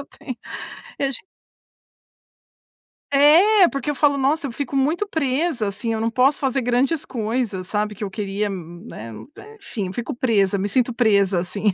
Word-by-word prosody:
eu 280 - -9
tenho 255 -4 -6 2.8
É 345 +8 +6
porque 275 -1 -3
eu - - -5
falo: 285 -1 +3
"Nossa, 280 +2 +1
eu - - -6
fico 280 0 -4
muito 305 +9 +1
presa 280 - -1
assim. 210 +4 -3
Eu 220 - -1
não 225 +1 0
posso 255 +4 +3
fazer 270 -1 0
grandes 265 +6 +1
coisas, 225 -6 -3
sabe 210 0 -1
que 210 - -7
eu - - -5
queria, 205 0 -2
né?" 170 - -8 0.5
Enfim, 205 - -4
eu 185 - -6
fico 240 +4 -4
presa, 205 -6 +2
me 200 +2 -2
sinto 245 +2 +1
presa 200 -6 +3
assim. 200 +3 0
240 Hz, 160 wpm, -22 LUFS, 205-280 Hz, 2.8 s, É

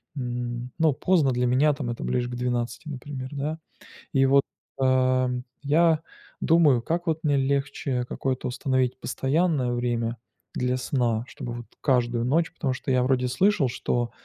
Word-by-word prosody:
м, 120 -1 -4
ну 160 -2 +3
поздно 155 -1 +2
для 125 0 +1
меня 135 +5 +3
там 140 -3 -4
это 120 - -4
ближе 125 -1 -1
к 125 - -5
12, 120 +2 -2
например, 135 -2 -6
да. 150 +3 -3 0.5
И 135 -1 +4
вот, 140 +1 +5 0.4
ам, 130 -1 +2 0.2
я 160 +2 +3 0.4
думаю: 155 -7 +4
как 170 +7 -2
вот 160 -1 0
мне 145 -2 +3
легче 140 -1 0
какое-то 130 +1 -2
установить 130 0 0
постоянное 140 -2 0
время 120 -1 -1 0.4
для 125 0 0
сна, 120 -3 0
чтобы 120 -3 -6
вот 120 -1 -7
каждую 120 -3 +1
ночь 165 +6 +1
потому 135 -6 -2
что 130 - -5
я 130 -1 +3
вроде 125 0 +1
слышал, 175 +2 +2
что 120 0 -1
130 Hz, 155 wpm, -26 LUFS, 125-145 Hz, 0.5 s, вот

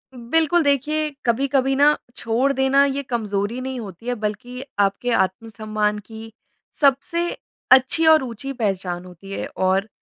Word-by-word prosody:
बिल्कुल 320 +7 +1
देखिए, 300 +2 +1 0.2
कभी-कभी 270 +2 +1
ना 290 +2 +4 0.2
छोड़ 240 +5 0
देना 265 +1 +3
ये 280 0 -2
कमज़ोरी 215 -1 -2
नहीं 260 -1 -4
होती 205 0 -9
है 245 - 0
बल्कि 245 +5 -4 0.2
आपके 200 +5 +1
आत्म-सम्मान 215 +1 -1
की 225 0 -10 0.5
सबसे 285 +5 +2 0.5
अच्छी 265 +6 +5
और 315 -3 +6
ऊँची 255 +2 -6
पहचान 190 -6 -2
होती 180 +2 -12
है - - -4
और 190 +2 +1
245 Hz, 140 wpm, -22 LUFS, 210-275 Hz, 0.5 s, और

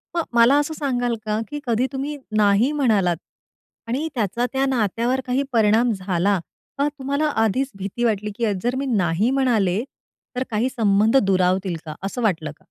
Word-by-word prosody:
मग 335 - +1
मला 235 +4 +6
असं 295 +2 -2
सांगाल 245 -6 -1
का, 215 0 -1
की 295 - -4
कधी 240 +2 +1
तुम्ही 285 +2 -3 0.2
नाही 210 +6 +4
म्हणालात 200 - +2 0.7
आणि 270 +7 -1
त्याचा 230 +2 0
त्या 270 +1 +1
नात्यावर 245 +1 0
काही 255 +2 0
परिणाम 225 +2 +3
झाला? 190 0 0 0.4
का 285 +1 +2
तुम्हाला 280 +1 -2 0.2
आधीच 260 +6 0
भीती 200 +5 -4
वाटली 210 -2 0
की 235 - 0
अ 215 - +1
जर 245 +1 0
मी 275 +1 -2
नाही 200 -3 +1
म्हणाले 220 -7 +2 0.5
तर 255 - 0
काही 230 +3 0
संबंध 220 -1 +3
दुरावतील 185 -1 +1
का? 155 -1 -6
असं 200 +6 -3
वाटलं 165 -8 0
का? 150 - -16
230 Hz, 170 wpm, -22 LUFS, 200-260 Hz, 0.7 s, मला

